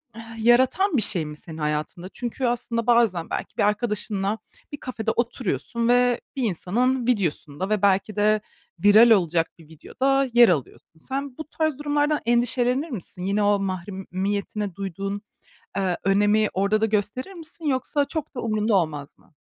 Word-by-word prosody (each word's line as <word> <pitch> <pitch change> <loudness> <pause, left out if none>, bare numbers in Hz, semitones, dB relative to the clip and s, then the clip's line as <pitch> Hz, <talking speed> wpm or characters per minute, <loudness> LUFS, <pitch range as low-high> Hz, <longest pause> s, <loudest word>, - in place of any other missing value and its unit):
eh 225 0 -9
yaratan 260 +9 +4
bir - - +2
şey 180 -6 +2
mi 150 0 -8
senin 160 +1 -10
hayatında? 155 +4 -3
Çünkü 245 +2 -4
aslında 235 -1 -1
bazen 225 -9 +3
belki - - -5
bir - - +2
arkadaşınla 210 -1 0 0.3
bir 290 - -5
kafede 245 -4 -3
oturuyorsun 235 - -2
ve 245 0 +3
bir 265 - -2
insanın 235 +6 0
videosunda 185 - -1
ve 215 -2 +1
belki 200 +1 +2
de 210 0 +2 0.4
viral 215 +3 +8
olacak 170 -5 +3
bir 160 - -16
videoda 270 - 0
yer 240 -1 +7
alıyorsun. 160 0 -3
Sen 270 - -5
bu 315 - -6
tarz 315 -4 -1
durumlardan 295 0 +1
endişelenir 245 +4 +1
misin? 180 - -6
Yine 200 +2 +1
o 205 0 +3
mahremiyetine 195 +1 -3
duyduğun, 195 +1 -4 0.6
eee, 190 -3 0
önemi 205 +2 +3
orada 200 +3 +1
da 220 - +3
gösterir 215 - -2
misin? 330 -2 -7
Yoksa 280 +1 0
çok 300 +1 -5
da - - -2
umurunda 215 -1 0
olmaz 150 -5 -2
mı? 170 - -27
215 Hz, 155 wpm, -24 LUFS, 190-245 Hz, 0.6 s, viral